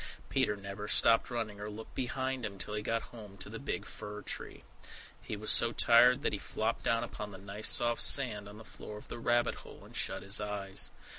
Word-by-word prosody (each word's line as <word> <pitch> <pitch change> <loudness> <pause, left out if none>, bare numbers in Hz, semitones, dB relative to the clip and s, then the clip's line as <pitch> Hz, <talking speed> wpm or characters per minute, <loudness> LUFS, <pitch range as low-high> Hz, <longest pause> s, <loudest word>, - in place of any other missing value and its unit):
Peter 105 - +1
never 100 +1 -7
stopped 115 +1 +4
running 110 -4 -4
or 105 - -4
looked 110 +1 -9
behind 130 +1 -2
him 100 -2 -5
till 100 +3 -4
he 105 - -2
got 115 +2 -1
home 105 -4 -11
to 95 - -7
the - - -6
big - - -4
fir 105 0 -8
tree. - - -7 0.6
He 105 - -5
was 110 +1 +2
so 115 0 +5
tired 125 +3 +5
that - - +1
he 105 - -2
flopped 110 +3 -2
down 115 0 +1
upon 105 -3 -6
the 100 - -10
nice 100 +2 -2
soft 120 -2 +3
sand 105 -7 +5
on 105 - -11
the 110 - -11
floor 105 0 -9
of - - -13
the - - -6
rabbit 120 +1 +1
hole, - - -13
and - - -14
shut - - 0
his 100 +1 +1
eyes. 100 -2 -2
105 Hz, 220 wpm, -32 LUFS, 105-115 Hz, 0.6 s, so